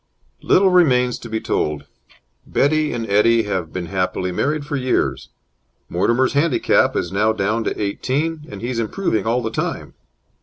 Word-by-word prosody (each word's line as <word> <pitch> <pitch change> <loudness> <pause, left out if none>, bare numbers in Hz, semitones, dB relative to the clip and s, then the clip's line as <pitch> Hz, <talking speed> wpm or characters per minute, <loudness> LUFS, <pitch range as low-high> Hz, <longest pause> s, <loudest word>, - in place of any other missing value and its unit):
Little 190 0 +4
remains 125 -9 +3
to 115 - -9
be 110 0 -2
told. 75 -7 -2 0.6
Betty 155 +2 +1
and 115 -2 -3
Eddie 115 +3 +3
have 95 -6 -3
been 90 -1 -4
happily 90 0 -2
married 145 +9 -1
for 145 -1 -3
years. 95 - -1 0.6
Mortimer's 120 +9 +1
handicap 145 0 +2
is - - -2
now 105 +3 +2
down 110 +2 -1
to - - -2
eighteen, 150 +10 -2
and 100 - -8
he 120 - -3
is 120 - -2
improving 110 - -1
all 120 +2 +1
the 110 - -3
time. - - -4
115 Hz, 160 wpm, -20 LUFS, 100-140 Hz, 0.6 s, Little